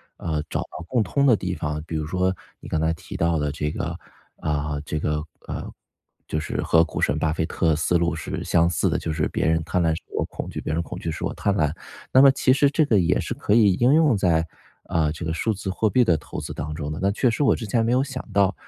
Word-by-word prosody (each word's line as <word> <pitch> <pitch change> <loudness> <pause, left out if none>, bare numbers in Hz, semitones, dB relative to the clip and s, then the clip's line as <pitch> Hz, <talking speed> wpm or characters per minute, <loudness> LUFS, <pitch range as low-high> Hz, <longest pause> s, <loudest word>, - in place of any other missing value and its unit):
呃， 80 -2 -2
找 - - -1
到 85 - -8
共 120 +1 +1
通 140 +9 +1
的 125 -5 +6
地 90 -2 -3
方。 75 -3 -3
比 80 -1 -3
如 75 -1 -3
说， 95 +2 +1 0.3
你 - - -9
刚 80 - 0
才 80 +1 +1
提 80 - -8
到 85 -1 +2
的 75 -1 -1
这 75 +1 -2
个 - - -4 0.4
啊， 75 -1 -2
这 75 - -3
个 75 0 -1 0.3
呃， - - -5 0.6
就 80 - -1
是 80 - -3
和 80 - +4
股 80 - -2
神 75 +4 +1
巴 80 -1 +1
菲 80 0 -1
特 80 -2 +1
思 80 +3 +2
路 85 -1 0
是 - - -5
相 85 0 +3
似 85 - +1
的， - - 0
就 80 - -3
是 75 -1 0
别 - - -2
人 80 0 +2
贪 90 - 0
婪 80 - +2
时 80 - -5 0.2
我 - - +2
恐 - - -7
惧， - - -5
别 - - -3
人 85 - +1
恐 80 - -7
惧 80 - -3
时 - - -4
我 - - -2
贪 100 - 0
婪。 75 -5 +1 0.4
那 130 - +8
么 140 - +8
其 135 -1 +3
实 140 +1 +4
这 155 +1 +2
个 110 -7 +3
也 85 - +2
是 - - -3
可 - - -1
以 105 -4 +5
应 120 +8 +3
用 155 -7 +4
在， 85 -4 +2 0.4
呃， 80 -3 +2
这 80 - -7
个 80 -1 -2
数 110 +6 0
字 100 -1 -5
货 110 +3 +1
币 125 +3 +4
的 85 -8 +3
投 - - -7
资 - - -6
当 75 +1 -5
中 75 -1 -4
的。 75 - -5
那 100 - +2
确 125 +4 +2
实 130 - 0
我 135 - +4
之 115 - -6
前 115 +2 +1
没 115 - +1
有 130 +1 +3
想 135 -2 -6
到。 100 0 +3
85 Hz, 290 characters per minute, -24 LUFS, 80-110 Hz, 0.6 s, 那